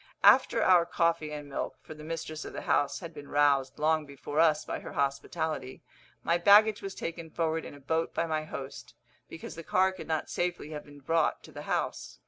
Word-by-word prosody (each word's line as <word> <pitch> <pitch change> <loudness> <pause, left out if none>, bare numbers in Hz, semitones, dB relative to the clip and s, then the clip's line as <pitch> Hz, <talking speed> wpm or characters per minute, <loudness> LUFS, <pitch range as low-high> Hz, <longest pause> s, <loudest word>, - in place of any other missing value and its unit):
After 255 -3 +6
our 180 -2 +6
coffee 165 -3 0
and 150 -1 -6
milk 140 - -4
for - - -9
the 150 0 -12
mistress 155 -1 -5
of - - -8
the - - -6
house 145 +5 +1
had 170 -2 -8
been 145 -2 -10
roused 140 -2 +2
long 155 0 +1
before 140 +2 -4
us 155 -2 +4
by - - -4
her - - -9
hospitality 140 0 -2 0.4
my 170 +1 +2
baggage 205 +3 +6
was 195 -1 -6
taken 165 -1 -5
forward 160 0 -1
in - - -9
a - - -13
boat 160 +4 -1
by 170 - -1
my 155 -1 -2
host, 135 -3 -8 0.3
because 165 - -8
the 165 - -8
car 185 +3 +2
could 185 - -9
not 160 -1 -1
safely 175 -3 -3
have 150 -1 -6
been 145 -1 -14
brought 165 +3 +1
to - - -13
the - - -8
house. - - -2
160 Hz, 210 wpm, -29 LUFS, 145-170 Hz, 0.4 s, After